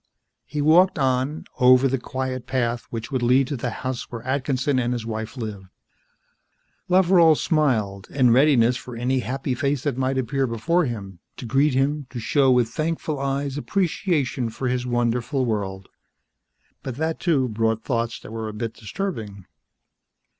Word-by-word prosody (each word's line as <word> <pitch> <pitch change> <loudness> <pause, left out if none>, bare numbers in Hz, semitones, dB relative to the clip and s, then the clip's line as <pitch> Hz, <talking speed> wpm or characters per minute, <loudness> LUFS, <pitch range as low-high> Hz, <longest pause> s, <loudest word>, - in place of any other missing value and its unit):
He 150 - -3
walked 175 +5 +5
on, 135 +2 0
over 130 +1 +6
the 135 0 -1
quiet 130 0 -4
path 120 -2 -1
which 115 -1 -6
would 130 -2 -1
lead 125 +3 +4
to 145 - -2
the 120 -1 -3
house 130 +2 -5
where 115 -2 -7
Atkinson 130 0 0
and 120 0 0
his 120 -2 -4
wife 110 +2 -5
lived. 105 -5 -6 1.2
Loveral 180 -3 +5
smiled, 110 - 0
in 130 -4 +3
readiness 125 -2 +4
for 125 -1 -8
any 125 +3 0
happy 130 +1 -3
face 140 +1 -1
that 140 -5 -1
might 130 +1 0
appear 130 +2 0
before 165 +10 +1
him, 100 -7 -6 0.2
to - - -7
greet 135 +3 +2
him, 140 +1 0
to 125 - -6
show 135 +4 +2
with 125 -3 +3
thankful 155 +1 -2
eyes 140 +1 -2
appreciation 155 - 0
for 125 +4 -4
his 125 0 -1
wonderful 120 +2 0
world. 95 -4 -3 0.9
But 130 - -5
that, 160 +3 -2
too, 145 -8 +2
brought 110 0 -1
thoughts 115 -2 -2
that - - -11
were 110 -1 -4
a - - -7
bit 115 +1 -4
disturbing. 110 - -5
130 Hz, 160 wpm, -23 LUFS, 115-140 Hz, 1.2 s, over